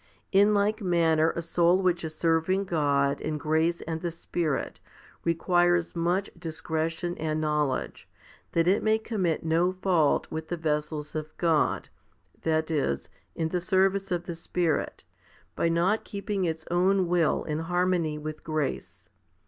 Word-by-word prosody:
In 205 +2 +5
like 210 +2 +1
manner 165 -4 +3
a 170 - -3
soul 175 +3 +3
which 175 -1 +1
is 155 -1 -4
serving 165 +4 +1
God 145 -5 +1
in 155 -1 -2
grace 160 +3 +1
and 160 0 -4
the 175 - -1
Spirit 165 -3 -3 0.4
requires 175 +1 +2
much 175 +4 0
discretion 165 +1 -2
and 155 0 -1
knowledge, 150 -3 -1 0.4
that 165 0 +2
it 195 +3 +3
may 220 0 +3
commit 200 -7 -1
no 165 +3 +2
fault 185 -5 +2
with 160 0 -4
the 175 - -3
vessels 150 -1 -2
of 155 0 -6
God, 165 -3 +1 0.5
that 160 0 0
is, 135 - -1 0.2
in 160 -1 -1
the 180 +1 -1
service 195 +1 +2
of 175 -1 -1
the 170 - -4
Spirit, 165 -1 -2 0.5
by 170 - +1
not 175 +6 +1
keeping 200 -2 -3
its 160 -1 -3
own 185 +1 +3
will 170 -3 +2
in 150 0 -3
harmony 175 -2 0
with 155 0 -6
grace. 155 -3 -3
170 Hz, 150 wpm, -27 LUFS, 155-180 Hz, 0.5 s, In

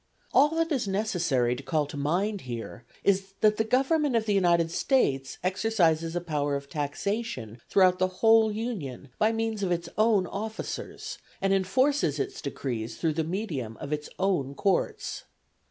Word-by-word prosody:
All 290 +3 +6
that 330 0 0
is 260 -8 0
necessary 175 - +1
to 125 - -7
call 145 +3 0
to 145 - -9
mind 180 +8 0
here 120 -1 -7 0.2
is, 195 0 +1
that 210 -1 +4
the 220 - +2
Government 270 +4 +2
of 225 -1 +2
the 210 - +1
United 170 -4 +3
States 135 - +1
exercises 175 -4 +1
a 175 - 0
power 145 -4 -1
of 140 0 -5
taxation 145 - -3
throughout 185 -2 +4
the 185 - +3
whole 220 +4 +4
Union 190 - -5
by 215 +1 +4
means 225 -1 -2
of 190 -2 0
its 170 0 -1
own 215 -4 +4
officers, 215 +4 -5 0.2
and 195 0 +2
enforces 195 - +2
its 140 - -3
decrees 120 -5 -4
through 160 -2 0
the 160 +1 0
medium 155 - -4
of 145 0 -5
its 150 0 -4
own 175 -8 0
Courts. 195 +6 -1
185 Hz, 165 wpm, -28 LUFS, 145-220 Hz, 0.2 s, All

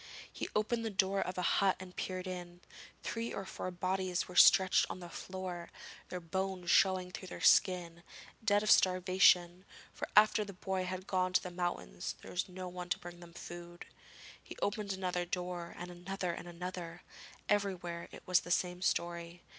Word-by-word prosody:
He - - -4
opened 230 +2 +1
the 225 - -1
door 195 -1 +1
of 185 - -3
a 180 - -1 0.2
hut 195 -1 +4
and 185 -1 -10
peeped 185 0 -3
in: 175 -1 -7 0.4
three 230 0 -3
or 195 - -4
four 185 - -5
bodies 185 0 -1
were 180 - -10
stretched 190 +1 +7
on - - -5
the 175 -1 -9
floor, 185 -2 -6 0.4
their 180 - -4
bones 185 +1 -2
showing 185 -1 +4
through 185 - -7
their - - -7
skin, 175 -2 +4 0.4
dead 205 -1 +3
of 215 - +3
starvation; 185 -1 +5 0.3
for - - -4
after 215 0 +6
the 200 -1 -8
boy 190 0 -2
had 185 +1 -4
gone 185 -1 0
to - - +3
the 180 - -5
mountains 175 - -3
there - - -9
was 180 +1 -2
no 185 0 -6
one 180 0 -7
to - - +1
bring 175 0 -10
them 170 -1 -13
food. 175 0 -9 0.6
He - - -11
opened 205 0 -1
another 185 -2 -1
door, 175 -1 -4
and 175 +1 -6
another 180 +1 -3
and 175 - -7
another; 175 -1 -6 0.4
everywhere 180 -4 -1
it - - -11
was 180 -1 +4
the - - -10
same 180 0 0
story. 170 -1 -1
180 Hz, 180 wpm, -34 LUFS, 175-190 Hz, 0.6 s, stretched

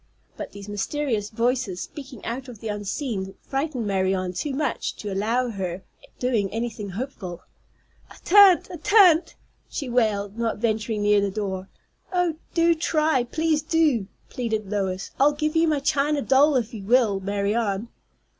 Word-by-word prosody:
But - - -7
these 200 0 -10
mysterious 210 +1 -2
voices 235 -4 -1
speaking 270 -6 -9
out 255 +3 -4
of 245 -3 -9
the 225 - -5
unseen 205 -1 -3
frightened 270 -3 -2
Marianne 190 -2 0
too 285 +10 -3
much 275 -1 -2
to 205 -2 -5
allow 225 +6 +1
of 240 - -4
her 185 -1 -4 0.3
doing 230 -6 0
anything 225 -3 -4
helpful. 190 -4 -6 0.7
"I - - -14
tan't! 390 -1 +7
I 350 - -6
tan't!" 360 -2 +5 0.3
she 275 -4 -4
wailed, 215 -3 0
not 230 -2 0
venturing 215 -1 -1
near 205 0 +4
the 200 - 0
door. 195 -2 -4 0.4
"Oh, 355 -4 +1 0.2
do 335 0 +5
try, 310 -5 +1
please 315 +4 0
do!" 305 - +2 0.2
pleaded 220 -5 -3
Lois. 190 -2 -2
"I'll 290 +2 +5
give 305 +2 -2
you 325 0 +4
my 305 -2 +2
china 285 +1 +1
doll 280 +2 +4
if 240 -1 0
you 215 - -6
will, 220 -2 +3
Marianne." 200 +2 -1
235 Hz, 155 wpm, -24 LUFS, 200-290 Hz, 0.7 s, tan't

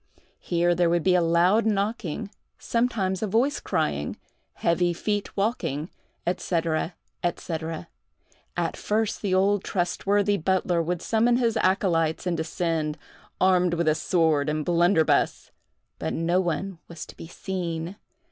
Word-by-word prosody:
Here 175 0 +1
there 175 0 +2
would 170 -1 +1
be 185 - +4
a 180 - +4
loud 170 +6 +4
knocking—sometimes 205 0 -2
a 215 - 0
voice 240 +8 +1
crying—heavy 175 +1 -2
feet 205 +4 -3
walking, 195 - -1 0.3
&c., 175 +1 0 1.0
&c. 165 - -4 1.0
At - - -1
first, 215 0 -1
the 200 -3 0
old 195 +1 +3
trustworthy 200 +3 +1
butler 180 -1 +1
would 175 +1 -2
summon 235 +2 +3
his 235 -3 +1
accolytes, 170 -4 +1
and 180 -2 0
descend, 160 -1 -1 0.4
armed 180 -2 +3
with 160 -2 +2
sword 155 -4 +2
and 150 0 -1
blunderbuss; 175 -1 +2 0.5
but 80 - -2
no 170 +3 +1
one 175 +1 -3
was 170 -1 -8
to - - -13
be - - -9
seen. 175 -1 -4
180 Hz, 125 wpm, -26 LUFS, 165-200 Hz, 1.0 s, be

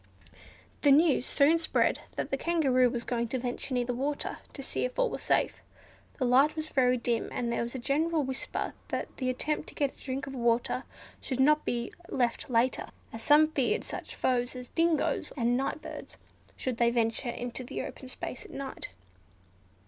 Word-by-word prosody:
The 290 - +5
news 290 -2 +5
soon 310 +4 +4
spread 325 - +2 0.2
that - - -3
the - - +2
Kangaroo 270 -6 +3
was 240 -1 -3
going 235 -1 -1
to 260 - -2
venture 250 +1 -3
near 245 -1 +1
the 245 - -1
water, 280 +4 -2
to 275 - -7
see - - -2
if 250 - -3
all - - +2
was - - -4
safe. - - +1 0.6
The 260 - 0
light 270 +5 +5
was 310 0 -4
very 255 -3 +3
dim, 235 -1 -1
and 235 -1 -2
there - - 0
was 235 +2 -4
a - - -1
general 305 +5 +1
whisper 265 0 -3
that - - -4
the 255 -2 -1
attempt 300 +4 -1
to - - -14
get 285 -2 0
a - - -24
drink 270 +1 -4
of 270 - -7
water 240 +1 +1 0.4
should 260 -1 -3
not 300 +3 +4
be 235 -1 -1 0.2
left 240 -1 0
later; 245 +1 +2 0.3
as 225 - -6
some 300 +5 +6
feared 270 -6 +1
such - - -7
foes 245 0 0
as 250 -1 -8
dingos 330 -2 +1
and 240 -1 +2
night 275 +4 -1
birds, - - -8 0.4
should 255 -3 -2
they 235 0 +4
venture 235 +1 0
into 245 +1 -4
the 245 - -4
open 260 - -8
space 255 - -5
at - - -13
night. 275 -1 -6
255 Hz, 195 wpm, -30 LUFS, 245-285 Hz, 0.6 s, some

